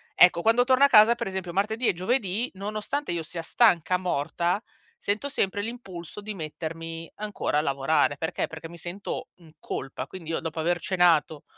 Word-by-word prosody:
Ecco, 175 -1 +6
quando 225 +5 +4
torno 260 +2 +4
a - - +9
casa, 230 -1 +7
per - - -4
esempio, 190 -2 -4
martedì 220 +5 0
e - - +4
giovedì 215 +3 -1
nonostante 215 +7 -3
io 170 -1 -2
sia 165 +1 -6
stanca 180 -2 +3
morta 175 +2 -1 0.4
sento 215 +8 -1
sempre 205 -5 0
l'impulso 205 -6 -7
di 215 +1 -5
mettermi 165 -1 -6
ancora 210 -7 -1
a - - +2
lavorare, 140 0 +1
perché? 160 +3 -2
Perché 165 0 -8
mi 170 0 -12
sento 175 +4 -5
in 165 -3 -18
colpa, 130 0 -5
quindi 165 -3 -8
io - - 0
dopo 160 0 -5
aver 175 +2 +1
cenato, 170 -5 +2
180 Hz, 175 wpm, -26 LUFS, 165-215 Hz, 0.4 s, a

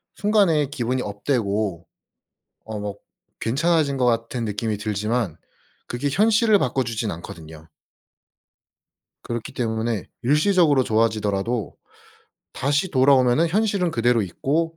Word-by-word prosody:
순간에 195 -8 +2
기분이 130 -2 -2
업되고 105 - -2 0.8
어 110 -1 -6
먹 105 0 -6 0.4
괜찮아진 150 +3 +1
것 130 - +1
같은 115 0 0
느낌이 105 0 -2
들지만 105 -2 -2 0.5
그게 120 +4 -2
현실을 215 - +4
바꿔 130 -4 0
주지는 115 -3 -3
않거든요. 80 -1 -11 1.6
그렇기 120 -1 -5
때문에 110 -3 -2 0.2
일시적으로 150 +1 +3
좋아지더라도 110 -1 0 0.8
다시 145 +7 0
돌아오면은 130 +2 +4
현실은 200 -1 +1
그대로 120 -3 +2
있고 155 - -1
120 Hz, 285 characters per minute, -23 LUFS, 110-150 Hz, 1.6 s, 현실을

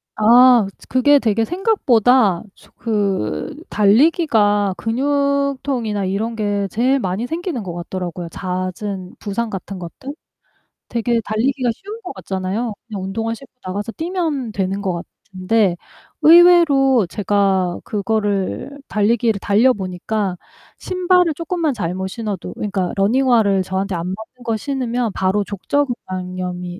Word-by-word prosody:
아 240 0 +6
츠 - - -17
그게 285 +3 +5
되게 225 -3 +1
생각보다 250 - +2
조 - - -22
그 195 - -1
달리기가 210 - +3
근육통이나 275 -3 0
이런 210 +5 -2
게 205 -2 -1
제일 255 +6 +1
많이 190 +1 -2
생기는 325 - -4
것 175 -3 -6
같더라고요. 175 0 -5
잦은 185 +1 -4
부상 225 +3 -3
같은 195 -1 -6
것들. 260 - -8 0.7
되게 235 0 0
달리기가 250 +4 0
쉬운 415 - -9
것 370 - -7
같잖아요. 195 +4 -3
그냥 205 -4 -5
운동화 225 +4 -2
신고 270 +2 -15
나가서 205 +4 -4
뛰면 320 - -2
되는 195 0 -2
것 180 -4 -2 0.3
같은데 190 0 +1 0.5
의외로 310 - +6
제가 195 -2 0
그거를 205 +2 -1 0.2
달리기를 220 0 +1
달려 225 +7 +3
보니까 190 +1 -3 0.4
신발을 360 -2 +2
쪼끔만 335 -2 -1
잘못 185 -2 -3
신어도 205 -2 -5
그니까 195 -4 -2
러닝화를 220 -2 +3
저한테 190 +1 -2
안 170 0 -3
맞는 220 +6 -8
거 230 -2 -1
신으면 245 -2 -2
바로 190 +2 +1
족저근막염이 185 -5 -3
215 Hz, 290 characters per minute, -19 LUFS, 190-255 Hz, 0.7 s, 아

